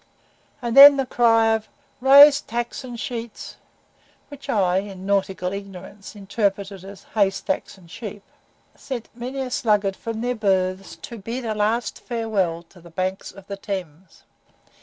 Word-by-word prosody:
And 235 -1 -2
then 280 +1 +11
the 270 - 0
cry 225 -2 +3
of 220 -1 -3 0.3
"raise 280 +2 +8
tacks 240 +3 -4
and 245 -2 -8
sheets" 235 -3 -6 0.7
(which 285 -1 -12
I, 190 -6 +2
in 195 -1 -8
nautical 190 -2 -1
ignorance, 200 +1 -9
interpreted 200 -1 -3
"hay 205 -3 +3
stacks 190 0 -4
and 180 -3 -18
sheep") 210 -3 -8 0.5
sent 255 -5 -7
many 250 +3 -5
a 255 -1 -4
sluggard 205 -5 +1
from 225 +1 -6
their 245 +1 -1
berths 190 -3 -1
to 235 - -8
bid 235 +5 -5
a 220 - -1
last 215 +3 -1
farewell 205 -8 -2
to 180 - -18
the 170 - -14
banks 185 +3 -3
of 195 - -15
the 200 0 -7
Thames. 185 -4 -7
210 Hz, 150 wpm, -22 LUFS, 195-235 Hz, 0.7 s, then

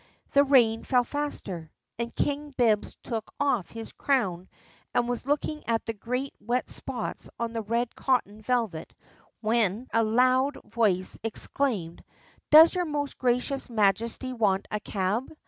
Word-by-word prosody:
The 280 - +6
rain 240 -5 +4
fell 250 -2 +3
faster, 220 - -4 0.3
and 235 0 -3
King 290 0 -2
Bibbs 225 -4 +2
took 225 -3 -4
off 255 -10 +1
his 225 -1 -8
crown 190 -10 0 0.5
and 240 - +2
was 245 +1 -3
looking 300 +1 -1
at 230 -1 0
the 225 - -2
great 250 +6 -3
wet 245 +2 -1
spots 250 -4 -4
on 230 -1 -2
the 225 - -2
red 230 +3 -1
cotton 220 -5 0
velvet 220 -9 -2 0.5
when 225 +1 +1
a 230 - +4
loud 255 +5 +3
voice 195 -6 0
exclaimed: 220 -6 -2 0.5
"Does 315 +2 +9
your 360 -1 0
most 290 -2 -3
gracious 250 +2 0
Majesty 230 +4 +1
want 205 -5 +1
a 210 - -1
cab?" 205 +5 -2
235 Hz, 145 wpm, -27 LUFS, 215-265 Hz, 0.5 s, Does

